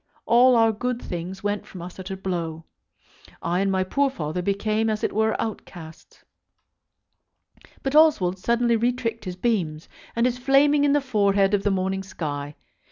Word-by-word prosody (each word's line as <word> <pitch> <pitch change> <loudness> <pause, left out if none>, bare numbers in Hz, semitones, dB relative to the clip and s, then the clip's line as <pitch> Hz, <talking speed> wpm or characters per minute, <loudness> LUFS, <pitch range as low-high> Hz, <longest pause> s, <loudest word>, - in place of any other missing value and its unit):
All 250 +2 +5
our 225 -1 +4
good 245 +3 -3
things 180 +1 -6
went 205 0 -1
from 185 - -10
us 180 +2 -10
at 190 +1 -7
a 190 - -4
blow. 170 -4 -4 0.8
I 175 +1 0
and 195 0 +1
my 190 -1 +1
poor 275 +9 +1
father 160 - -4
became 215 +4 0
as 215 -1 -2
it - - 0
were 220 +1 +1
outcasts. 175 -7 -8 1.6
But 270 - -2
Oswald 210 - +4
suddenly 235 +3 +2
retricked 235 -1 -1
his 180 -1 -5
beams, 180 -8 -1 0.3
and 235 +1 +2
is 250 0 0
flaming 285 +3 +4
in 285 - +3
the 290 - +3
forehead 200 -6 +2
of 205 - +2
the 205 - +1
morning 190 0 -1
sky. 145 -6 -5
205 Hz, 165 wpm, -24 LUFS, 185-235 Hz, 1.6 s, All